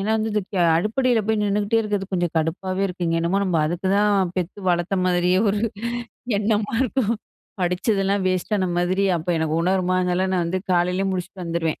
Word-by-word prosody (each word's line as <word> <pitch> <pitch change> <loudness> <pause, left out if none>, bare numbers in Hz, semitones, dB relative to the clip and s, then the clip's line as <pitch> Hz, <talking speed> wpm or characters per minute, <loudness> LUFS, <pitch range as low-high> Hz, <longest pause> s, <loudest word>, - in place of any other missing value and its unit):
ஏன்னா 205 +3 -1
வந்து 220 0 -1
இது 210 - +1 0.3
அடுப்படியில 230 +6 +2
போய் 220 0 +1
நின்னுட்டே 205 +2 +1
இருக்கிறது 205 -3 -2
கொஞ்சம் 175 -2 0
கடுப்பாவே 185 +4 -1
இருக்கு. 180 -1 -4
இங்க 165 - +1
என்னமோ 170 +4 +1
நம்ம 180 -4 0
அதுக்கு 175 +4 -3
தான் 205 -3 +3
பெத்து 180 +2 -3
வளர்த்த 175 +2 +1
மாதிரியே 180 0 +2
ஒரு 205 +1 +1 0.8
எண்ணமா 210 0 0
இருக்கும். 245 -3 0 0.5
படிச்சதெல்லாம் 195 +2 +1
வேஸ்ட்டான 185 +1 0
மாதிரி 185 +3 +1
அப்போ 170 +2 -3
எனக்கு 160 -1 -1
உணர்மா 185 0 +1
அதுனால, 180 +1 +1
நான் 180 -2 +1
வந்து 180 +3 -1
காலையிலயே 180 +2 +1
முடிச்சுட்டு 185 0 -5
வந்துருவேன். 165 -1 -2
185 Hz, 170 wpm, -22 LUFS, 175-205 Hz, 0.8 s, தான்